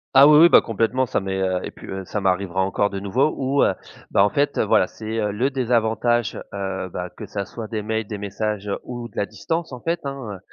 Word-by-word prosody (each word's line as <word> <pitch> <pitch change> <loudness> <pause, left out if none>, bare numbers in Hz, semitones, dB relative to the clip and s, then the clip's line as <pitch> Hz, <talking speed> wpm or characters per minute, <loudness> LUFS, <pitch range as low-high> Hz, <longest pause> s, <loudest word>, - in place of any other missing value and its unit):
Ah 135 +2 +9
oui, 150 0 +8
oui, 170 - +10
bah, - - +8
complètement, 115 +3 0
ça - - 0
m'est, 95 -1 -3
heu, 95 -1 +1
et - - -5
puis, - - -13
heu, 95 0 -5
ça 105 - -3
m'arrivera 95 0 0
encore 100 +2 +1
de 100 - -4
nouveau 120 +10 +1
ou, 140 +1 +1
heu, - - +3 0.4
bah 100 - +5
en 100 - +4
fait, 145 +5 0
heu, - - +4
voilà, 105 - +4
c'est, 110 - -12
heu, 105 -1 0
le 125 +7 0
désavantage, 120 -2 +1
heu, 95 -1 -3
bah, 90 0 -5
que 110 - -6
ça 100 0 -4
soit 110 +3 -7
des 110 -1 -3
mails, 110 +1 -2
des 105 0 -6
messages 105 0 -3
ou 120 -1 -6
de - - -20
la 100 - +1
distance 165 +8 -3
en 125 - -6
fait, 170 0 -1
hein, 130 -8 -5
110 Hz, 245 wpm, -22 LUFS, 100-125 Hz, 0.4 s, oui